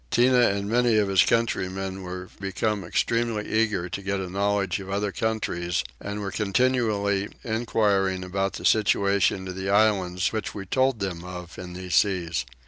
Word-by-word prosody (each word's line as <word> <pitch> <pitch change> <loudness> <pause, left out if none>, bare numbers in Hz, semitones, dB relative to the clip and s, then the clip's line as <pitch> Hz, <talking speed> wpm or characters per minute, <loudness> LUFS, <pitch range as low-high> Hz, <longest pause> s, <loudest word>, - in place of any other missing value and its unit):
Tinah 125 - +4
and 100 0 -3
many 120 0 +3
of 105 -2 +2
his 95 -2 +5
countrymen 95 -4 0
were 90 0 -7
become 100 +1 -1
extremely 115 +3 0
eager 105 -5 +1
to 95 +2 -5
get 100 0 -2
a 95 -2 -5
knowledge 100 0 0
of 95 0 -8
other 100 +1 -1
countries, 90 -6 -1 0.2
and 100 +1 -5
were 100 -1 -3
continually 105 -2 +1
enquiring 105 -5 +1
about 95 +1 -2
the - - -6
situations 100 -2 +2
of 90 - -5
the 95 +1 -3
islands 100 -3 +2
which 110 -1 -3
we 100 -2 -5
told 130 +2 +1
them 90 -3 -3
of 90 -1 -8
in 90 -1 -7
these 90 0 -6
seas. 85 - +1
100 Hz, 165 wpm, -25 LUFS, 95-110 Hz, 0.2 s, his